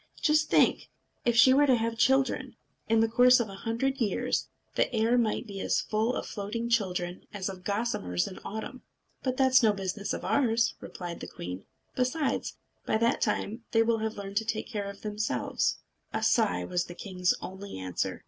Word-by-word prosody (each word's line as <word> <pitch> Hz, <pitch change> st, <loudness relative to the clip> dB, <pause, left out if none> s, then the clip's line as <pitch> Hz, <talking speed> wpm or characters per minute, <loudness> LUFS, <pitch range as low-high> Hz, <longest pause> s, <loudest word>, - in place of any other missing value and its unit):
"Just 305 Hz, 0 st, +3 dB
think! -, -, +3 dB, 0.4 s
If 240 Hz, -1 st, +3 dB
she 260 Hz, +2 st, +7 dB
were 290 Hz, +2 st, +5 dB
to 260 Hz, -, +5 dB
have 230 Hz, 0 st, -1 dB
children! 265 Hz, 0 st, +2 dB, 0.3 s
In 225 Hz, 0 st, +4 dB
the 225 Hz, -, +4 dB
course 250 Hz, +2 st, +6 dB
of 230 Hz, -3 st, -1 dB
a -, -, -8 dB
hundred 230 Hz, +7 st, -1 dB
years 210 Hz, -4 st, 0 dB, 0.3 s
the -, -, +1 dB
air 230 Hz, 0 st, +2 dB
might 235 Hz, 0 st, +1 dB
be 200 Hz, -3 st, -7 dB
as -, -, +1 dB
full 220 Hz, +3 st, 0 dB
of -, -, -3 dB
floating 225 Hz, +3 st, -4 dB
children 180 Hz, -6 st, -1 dB
as 195 Hz, -1 st, -3 dB
of 185 Hz, -1 st, -8 dB
gossamers 200 Hz, -, -1 dB
in 185 Hz, -, -8 dB
autumn." 220 Hz, +5 st, -6 dB, 0.4 s
"That 255 Hz, 0 st, -2 dB
is 260 Hz, -1 st, +6 dB
no 220 Hz, -3 st, +4 dB
business 195 Hz, +1 st, -3 dB
of -, -, -4 dB
ours," 235 Hz, -4 st, +2 dB
replied 175 Hz, -2 st, -7 dB
the -, -, -7 dB
queen. 90 Hz, +2 st, -7 dB, 0.3 s
"Besides, 260 Hz, +4 st, -1 dB, 0.3 s
by -, -, +1 dB
that 230 Hz, +1 st, +1 dB
time 225 Hz, +3 st, -1 dB
they 225 Hz, 0 st, +5 dB
will 225 Hz, 0 st, +1 dB
have 220 Hz, 0 st, -2 dB
learned 200 Hz, 0 st, -5 dB
to 225 Hz, -, +1 dB
take 220 Hz, -1 st, -2 dB
care 205 Hz, -4 st, -4 dB
of 200 Hz, 0 st, -10 dB
themselves." 210 Hz, -, -1 dB, 0.3 s
A -, -, -2 dB
sigh 90 Hz, 0 st, +2 dB
was 175 Hz, -, -1 dB
the 175 Hz, -, -10 dB
king's 180 Hz, -2 st, 0 dB
only 190 Hz, -, -7 dB
answer. 95 Hz, -1 st, -3 dB
220 Hz, 190 wpm, -29 LUFS, 195-240 Hz, 0.4 s, she